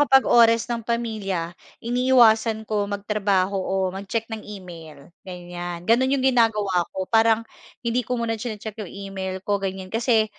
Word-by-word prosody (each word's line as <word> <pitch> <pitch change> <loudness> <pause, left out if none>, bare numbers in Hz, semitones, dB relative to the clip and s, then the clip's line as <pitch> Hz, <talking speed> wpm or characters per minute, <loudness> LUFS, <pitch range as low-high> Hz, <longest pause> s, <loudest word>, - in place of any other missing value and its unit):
kapag 270 -2 +5
oras 230 -1 +5
ng 235 -1 -3
pamilya, 215 -7 -3 0.3
iniiwasan 235 -3 +3
ko 210 -2 -1
magtrabaho 200 -2 0
o 190 - -3 0.2
mag-check 200 +4 -3
ng 220 - -4
email 170 -6 -11 0.2
ganyan. 175 -1 -7
Gano'n 235 +6 +3
'yong 270 -1 0
ginagawa 215 -8 +2
ko 190 - -4
parang 225 +2 +3 0.4
hindi 235 +1 +1
ko 250 +1 -3
muna 225 -2 -2
chini-check 220 -2 -6
'yong 205 - -6 0.2
email 190 -1 -4
ko 205 -1 0
ganyan. 190 -1 -5
Kasi 225 -1 +3
215 Hz, 150 wpm, -23 LUFS, 190-230 Hz, 0.4 s, kapag